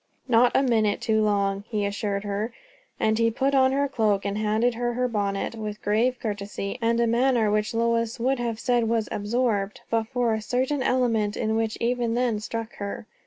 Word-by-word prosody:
"Not 245 0 +4
a 270 - +4
minute 220 -5 +2
too 220 -2 +1
long," 200 -1 +1
he 210 -3 -1
assured 200 0 -2
her; 205 +3 -2 0.5
and 220 +1 +1
he 230 0 +4
put 270 +5 0
on 260 -1 +4
her 280 +1 +1
cloak 215 -6 0
and 200 0 -1
handed 215 +3 +1
her 240 +1 -2
her 250 +1 0
bonnet 200 -3 -2
with 210 -2 -5
grave 230 +5 +1
courtesy, 205 0 -4
and 230 0 +2
a 235 - +3
manner 235 -2 +2
which 210 +1 0
Lois 230 0 0
would 260 +2 +1
have 230 -2 -2
said 240 -3 +1
was 225 -2 0
absorbed, 210 -2 -1
but 225 -1 +1
for 245 -2 0
a 220 - -2
certain 260 +5 -1
element 230 -5 +1
in 220 - -1
it - - +1
which 220 0 -1
even 235 -1 0
then 240 -3 +1
struck 225 +2 -5
her. 200 +2 -5
225 Hz, 200 wpm, -25 LUFS, 210-245 Hz, 0.5 s, Not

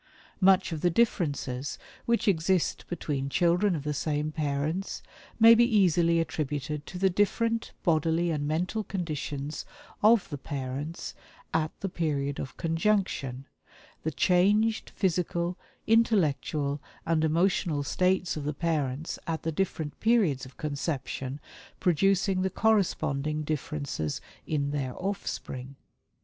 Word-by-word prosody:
"Much 190 -1 +4
of 160 -2 -3
the 175 - +4
differences 145 - 0 0.3
which 235 -1 +2
exist 185 -1 +1
between 145 -5 -2
children 175 +5 +3
of 145 - -4
the 150 0 -1
same 150 +1 -1
parents 155 +5 -2 0.4
may 230 +1 +9
be 235 +1 +6
easily 175 -7 +4
attributed 150 -2 -3
to 180 - -7
the 190 +1 +3
different 230 +4 +1
bodily 165 0 +2
and 145 -2 -1
mental 180 +8 -1
conditions 155 -6 -4 0.4
of 220 -1 +5
the 145 - -4
parents 140 +3 -5 0.4
at 160 -1 +1
the 195 - -1
period 145 -6 -1
of 135 - -6
conjunction, 165 -7 0 0.6
the 160 - -1
changed 205 +7 +2
physical, 175 -1 0 0.3
intellectual 155 -10 +2 0.2
and 160 -1 +2
emotional 165 -2 +2
states 185 +4 +1
of 150 - -4
the 150 0 -2
parents 150 -2 -1
at 165 -1 -2
the 165 - -1
different 160 -3 -2
periods 195 - +2
of 130 - -17
conception 140 -2 -3 0.4
producing 190 +2 +2
the 190 - +1
corresponding 155 -8 +1
differences 145 - -3 0.3
in 145 -2 0
their 135 -4 -2
offspring. 140 -9 -4
160 Hz, 125 wpm, -28 LUFS, 145-190 Hz, 0.6 s, may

